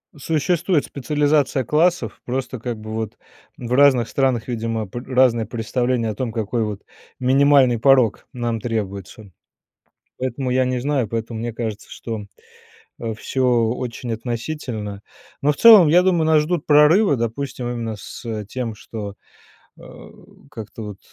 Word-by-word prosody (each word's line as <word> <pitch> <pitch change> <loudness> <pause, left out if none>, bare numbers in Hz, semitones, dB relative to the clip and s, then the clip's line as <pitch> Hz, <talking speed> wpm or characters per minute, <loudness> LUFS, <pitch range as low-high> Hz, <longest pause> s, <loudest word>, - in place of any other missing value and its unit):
существует 160 +3 0
специализация 145 0 0
классов, 155 - +1
просто, 130 0 -3
как 120 0 -4
бы, 110 0 -7
вот, 110 -1 -4 0.4
в 120 -1 -7
разных 130 -4 +5
странах, 130 -4 0
видимо, 115 -3 -3
пр 120 +5 -7
разные 125 -3 +3
представления 120 +1 -1
о 105 - -4
том, 125 0 -3
какой, 115 +1 -2
вот, 105 -2 -4 0.4
минимальный 135 -1 +4
порог 125 -2 +3
нам 120 -3 -2
требуется. 100 -2 -5 0.9
Поэтому 130 0 -2
я 130 +1 +3
не 130 0 -1
знаю, 135 -2 0
поэтому 115 +1 -4
мне 120 0 -4
кажется, 110 -3 -5
что, 110 -3 -6 0.7
а, 115 -1 -3
всё 130 +4 -2 0.3
очень 120 -1 -5
относительно, 115 -3 -5 0.4
но 145 - +3
в - - -4
целом 215 -8 +9
я 175 +4 +5
думаю, 175 -4 +2
нас 155 -1 +4
ждут 165 0 -2
прорывы, 150 +4 +5
допустим, 125 +2 -3
именно 115 -2 -3
с 105 +2 -6
тем, 115 +1 -5
что, 105 -2 -7 0.6
э, - - -15 0.7
как-то 110 -4 -9
вот 105 -2 -7
120 Hz, 140 wpm, -21 LUFS, 110-140 Hz, 0.9 s, целом